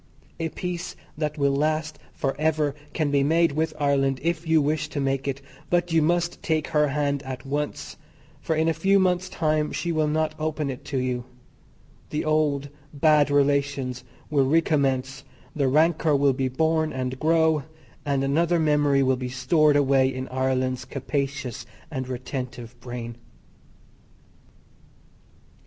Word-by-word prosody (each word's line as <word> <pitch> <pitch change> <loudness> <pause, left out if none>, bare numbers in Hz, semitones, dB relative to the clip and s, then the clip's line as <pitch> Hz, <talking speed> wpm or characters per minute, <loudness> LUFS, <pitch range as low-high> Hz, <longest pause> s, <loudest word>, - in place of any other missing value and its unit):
A 165 0 -1
peace 180 +1 -5 0.2
that 150 0 -3
will 140 -1 +2
last 155 +1 -1
for 135 -1 -2
ever 155 -2 +1 0.2
can 155 -3 -1
be 140 -1 +3
made 165 +3 +3
with 155 +2 0
Ireland 135 -2 +1
if 170 0 -1
you 160 0 +4
wish 150 +1 0
to 150 - -4
make 135 0 -1
it, 140 0 -3 0.3
but 175 0 +1
you 165 - +4
must 175 +2 0
take 155 -2 -1
her 150 -2 +3
hand 140 0 -1
at 130 -1 -7
once, 145 +1 -4 0.4
for 160 - -1
in 160 +1 +1
a 165 - +3
few 195 +4 +3
months' 185 -1 +1
time 155 -3 0
she 170 - -2
will 155 -2 +1
not 155 0 0
open 155 -2 -2
it 125 - -8
to 140 - -3
you; 125 -1 -1 0.8
the 150 - -2
old, 150 -2 +1 0.2
bad 150 0 +4
relations 140 -3 +1 0.3
will 140 -3 +3
re 160 +4 +5
commence, 135 -3 0 0.3
the 140 -3 +1
rancor 155 +2 +3
will 140 -1 +3
be 130 0 -1
born 160 +3 +1
and 130 0 -3
grow, 160 -1 +3 0.4
and 140 -2 0
another 165 +5 +2
memory 145 -3 +3
will 130 -1 +2
be 125 0 -4
stored 150 +4 +3
away 135 -2 +3
in 130 0 -5
Ireland's 130 -1 -1
capacious 135 -1 -4 0.2
and 130 -4 -4
retentive 125 -2 -5
brain. 120 -1 -7
145 Hz, 155 wpm, -25 LUFS, 135-155 Hz, 0.8 s, re